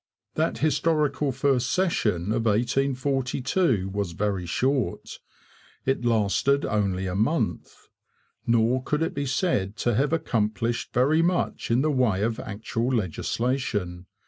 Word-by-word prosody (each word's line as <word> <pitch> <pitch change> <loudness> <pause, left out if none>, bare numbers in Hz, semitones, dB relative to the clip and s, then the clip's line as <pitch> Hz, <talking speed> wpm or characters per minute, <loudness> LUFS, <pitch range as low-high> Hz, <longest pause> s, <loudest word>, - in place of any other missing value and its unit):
That - - 0
historical 150 -1 +1
first 130 -1 +1
session 110 - 0
of 115 +1 0
1842 130 - 0
was 100 -3 -3
very 95 -1 -2
short; 125 - -1 0.7
it 135 -2 0
lasted 120 +5 +2
only 100 -3 0
a 90 - -3
month. 110 - -1 0.6
Nor 115 +2 +3
could 150 +4 -1
it - - -2
be 140 0 -2
said 110 - 0
to 120 - 0
have 140 +7 +1
accomplished 115 -6 -1
very 145 +6 +3
much 175 +1 0
in 120 +2 +3
the 155 - +2
way 120 -8 +1
of 115 0 -1
actual 110 +3 -3
legislation. 105 - -2
120 Hz, 125 wpm, -25 LUFS, 105-140 Hz, 0.7 s, Nor